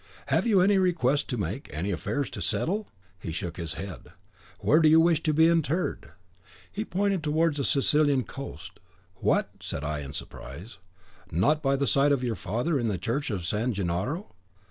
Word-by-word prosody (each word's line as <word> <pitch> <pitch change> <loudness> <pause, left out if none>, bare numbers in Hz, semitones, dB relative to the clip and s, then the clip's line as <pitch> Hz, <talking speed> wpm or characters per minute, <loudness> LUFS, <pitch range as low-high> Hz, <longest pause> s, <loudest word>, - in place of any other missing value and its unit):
'Have - - +2
you 200 -5 +5
any 195 +1 +4
request 150 -6 +2
to 125 - -2
make, 100 - -4
any 85 +7 -2
affairs 140 +9 -2
to - - -6
settle?' 205 +5 -1 0.3
He 85 - -5
shook 85 +1 -4
his 80 -2 -5
head. 95 -8 -7 0.5
'Where 155 - +4
would 160 -2 +5
you 160 +1 +7
wish 165 -2 +4
to 155 - +1
be 160 +2 +5
interred?' 165 +1 0 0.6
He 210 - -3
pointed 195 -2 0
towards 155 0 +1
the 140 - -1
Sicilian 140 0 +3
coast. 135 +5 -9 0.4
'What!' - - +1
said 70 - -5
I, 75 0 -2
in 70 -1 -7
surprise, 95 - -9 0.5
'NOT 145 - +2
by 135 -2 +2
the 140 +1 0
side 140 +1 +3
of 135 -3 +1
your 120 -2 0
father, 120 - -1
in 120 - 0
the 100 -4 0
church 135 - -2
of 95 -6 -3
San 110 +7 0
Gennaro? 100 - -2
140 Hz, 185 wpm, -27 LUFS, 100-160 Hz, 0.6 s, you